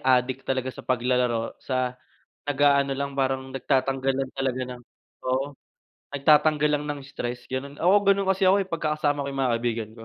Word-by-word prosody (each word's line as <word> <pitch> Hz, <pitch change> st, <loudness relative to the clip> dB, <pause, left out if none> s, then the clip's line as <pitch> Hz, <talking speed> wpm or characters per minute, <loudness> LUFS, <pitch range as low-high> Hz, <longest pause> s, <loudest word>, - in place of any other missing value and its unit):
adik 130 Hz, 0 st, +2 dB
talaga 130 Hz, -1 st, -1 dB
sa -, -, -9 dB
paglalaro 125 Hz, -2 st, 0 dB
sa 130 Hz, -1 st, -1 dB, 0.5 s
nag-aano 140 Hz, -1 st, +3 dB
lang, 140 Hz, 0 st, -3 dB
parang 130 Hz, -1 st, 0 dB
nagtatanggal 135 Hz, 0 st, 0 dB
lang 135 Hz, -1 st, -2 dB
talaga 130 Hz, -1 st, -1 dB, 0.2 s
ng 120 Hz, -, -16 dB, 0.4 s
oo, 135 Hz, +2 st, -1 dB, 0.6 s
nagtatanggal 150 Hz, +1 st, +4 dB
lang 150 Hz, -, -6 dB
ng 145 Hz, -1 st, -3 dB
stress, 120 Hz, -2 st, -5 dB
ganun. 140 Hz, +2 st, -4 dB
Oo, 190 Hz, +4 st, +5 dB
ganun 195 Hz, -1 st, +3 dB
kasi 190 Hz, 0 st, +2 dB
ako, 195 Hz, +2 st, +5 dB
eh, -, -, -19 dB
pagka 155 Hz, -3 st, -1 dB
kasama 145 Hz, -1 st, 0 dB
ko 140 Hz, -, -3 dB
yung 135 Hz, -, -3 dB
mga 130 Hz, -2 st, +2 dB
kaibigan 115 Hz, -2 st, -2 dB
ko. 115 Hz, -, -11 dB
135 Hz, 180 wpm, -25 LUFS, 130-145 Hz, 0.6 s, Oo